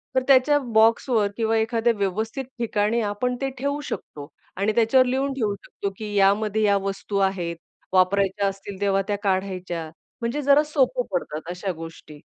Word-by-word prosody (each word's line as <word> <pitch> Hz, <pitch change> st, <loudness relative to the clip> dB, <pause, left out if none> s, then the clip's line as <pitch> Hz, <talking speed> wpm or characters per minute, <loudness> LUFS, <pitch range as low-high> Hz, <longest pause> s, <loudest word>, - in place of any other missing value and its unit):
तर 260 Hz, -, +4 dB
त्याच्या 275 Hz, +2 st, +5 dB, 0.2 s
बॉक्सवर 225 Hz, -1 st, +4 dB
किंवा 225 Hz, 0 st, +1 dB
एखाद्या 230 Hz, +1 st, +1 dB
व्यवस्थित 220 Hz, +6 st, -2 dB
ठिकाणी 225 Hz, 0 st, +1 dB
आपण 215 Hz, +4 st, -1 dB
ते 270 Hz, -, 0 dB
ठेवू 285 Hz, +2 st, -1 dB
शकतो 145 Hz, -1 st, -7 dB, 0.3 s
आणि 200 Hz, +3 st, +1 dB
त्याच्यावर 240 Hz, +3 st, +4 dB
लिहून 270 Hz, +2 st, 0 dB
ठेवू 220 Hz, -6 st, -1 dB
शकतो, 200 Hz, 0 st, -6 dB
की 210 Hz, -1 st, -6 dB
यामध्ये 205 Hz, +2 st, +3 dB
या 200 Hz, -1 st, +4 dB
वस्तू 195 Hz, +1 st, -3 dB
आहेत, 170 Hz, -3 st, -4 dB, 0.4 s
वापरायच्या 195 Hz, +1 st, +2 dB
असतील, 195 Hz, 0 st, -6 dB
तेव्हा 195 Hz, -1 st, +2 dB
त्या 205 Hz, -1 st, 0 dB
काढायच्या. 185 Hz, -4 st, -2 dB, 0.3 s
म्हणजे 240 Hz, +6 st, -1 dB
जरा 285 Hz, +2 st, +5 dB
सोपं 270 Hz, -4 st, +1 dB
पडतात 165 Hz, -2 st, -3 dB
अशा 180 Hz, +2 st, -3 dB
गोष्टी. 160 Hz, -2 st, -10 dB
210 Hz, 155 wpm, -24 LUFS, 195-240 Hz, 0.4 s, त्याच्या